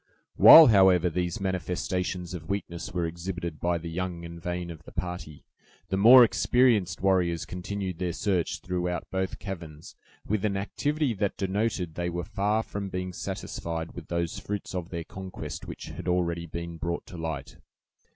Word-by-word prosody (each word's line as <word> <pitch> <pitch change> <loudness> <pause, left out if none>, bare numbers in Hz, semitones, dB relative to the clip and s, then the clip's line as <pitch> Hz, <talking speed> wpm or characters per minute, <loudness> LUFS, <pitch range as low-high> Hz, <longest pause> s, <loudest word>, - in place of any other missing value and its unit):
While, 160 - +11
however, 95 - +5
these 90 +1 -2
manifestations 90 -1 -2
of 80 -3 -7
weakness 90 -4 -4
were 85 -1 -1
exhibited 85 -1 -5
by 85 0 +1
the 85 0 -7
young 85 0 -4
and 85 0 -9
vain 90 0 -3
of 80 -2 -10
the - - -14
party, 90 -4 -6 0.4
the 95 - 0
more 120 +6 +9
experienced 115 -6 +2
warriors 90 -4 +2
continued 95 -1 -5
their 90 -1 -1
search 90 -4 -1
throughout 90 -1 -2
both 95 0 -2
caverns, 85 -6 -8 0.3
with 105 -1 -1
an 100 -2 0
activity 145 +7 -1
that 100 -1 -2
denoted 95 -3 -1
they 85 +1 -2
were 85 0 -3
far 105 +2 0
from 100 -2 -5
being 90 0 -4
satisfied 85 -1 -5
with 85 -3 -9
those 85 -1 -2
fruits 105 -1 -5
of 90 -2 -4
their 85 -3 -4
conquest 95 +2 -7
which - - -8
had 85 +4 -8
already 85 -1 0
been 85 +1 -6
brought 85 +1 -3
to 90 - -10
light. 80 -3 -5
90 Hz, 165 wpm, -27 LUFS, 85-95 Hz, 0.4 s, While